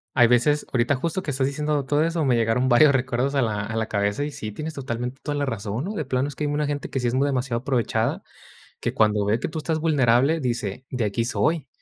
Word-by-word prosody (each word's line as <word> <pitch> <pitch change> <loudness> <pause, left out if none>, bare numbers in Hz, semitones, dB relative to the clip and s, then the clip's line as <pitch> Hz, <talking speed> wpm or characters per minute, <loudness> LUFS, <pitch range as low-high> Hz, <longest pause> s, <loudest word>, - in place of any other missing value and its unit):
Hay 120 -3 +6
veces, 125 +5 +3
ahorita 125 +3 +2
justo 165 +7 -2
que 170 - -6
estás 135 -1 0
diciendo 145 0 -1
todo 145 +2 +2
eso, 165 -2 0
me 125 -3 +3
llegaron 115 +3 +1
varios 135 +4 +6
recuerdos 130 +1 0
a 135 - +3
la 105 -2 -1
a 110 +2 -5
la 110 0 0
cabeza 100 +5 -1
y 150 - -3
sí, 110 -6 -6
tienes 155 +8 -5
totalmente 125 -1 -5
toda 145 -1 -2
la 145 - 0
razón, 115 - -3
¿no?, 210 - -4
de 155 - -2
plano 130 +1 -1
es 145 - -7
que 150 - -2
hay 145 - 0
una 150 +1 0
gente 145 0 -3
que 135 - -2
sí 125 - 0
es 120 - -1
muy 135 +2 +2
demasiado 125 -3 -1
aprovechada, 125 -5 0 0.6
que - - -2
cuando 105 -1 +2
ve 105 +3 +1
que - - -2
tú 155 - -6
estás 160 0 -1
vulnerable, 140 -1 +3
dice: 120 -3 -3
"De 125 -3 -2
aquí 105 +3 -1
soy". 155 +3 0
130 Hz, 255 wpm, -24 LUFS, 120-145 Hz, 0.6 s, Hay